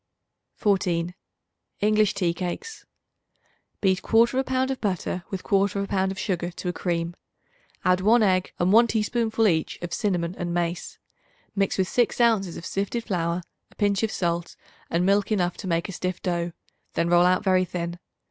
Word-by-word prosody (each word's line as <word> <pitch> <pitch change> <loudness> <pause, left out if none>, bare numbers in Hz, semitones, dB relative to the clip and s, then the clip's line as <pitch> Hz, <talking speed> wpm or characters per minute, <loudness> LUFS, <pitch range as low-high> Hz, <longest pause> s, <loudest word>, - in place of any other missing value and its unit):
14. 180 -4 +1 0.7
English 215 0 +3
Tea 180 -4 +1
Cakes. 185 - -5 1.0
Beat 190 -2 +2
1/4 235 +4 +3
pound 260 0 0
of 265 - -4
butter 185 -3 -2
with 190 -2 -5
1/4 200 0 +1
pound 190 -1 0
of 195 - -6
sugar 175 -4 -1
to 180 +1 -7
a - - -2
cream. 170 0 -2 0.7
Add 180 0 +3
1 220 +4 +5
egg 185 -2 +2
and 180 +3 +2
1 235 +2 +7
teaspoonful 225 0 +1
each 160 -5 0
of 175 -1 -4
cinnamon 175 -4 0
and 175 -1 -2
mace. 175 0 -2 0.6
Mix 195 -1 +1
with 190 -1 +1
6 240 +4 +1
ounces 220 -7 +2
of - - -8
sifted 200 +4 -2
flour, 175 -3 -1 0.3
a - - -23
pinch 200 -1 +1
of 220 -1 0
salt 170 -3 -2 0.3
and 170 +2 +1
milk 200 +2 +2
enough 180 -4 +1
to - - -6
make 170 -1 0
a - - -6
stiff 180 -1 -3
dough; 175 -1 -1 0.4
then 170 - +1
roll 175 +1 +5
out 185 0 +2
very 185 -1 +3
thin. 175 -1 -4
185 Hz, 170 wpm, -25 LUFS, 175-210 Hz, 1.0 s, 1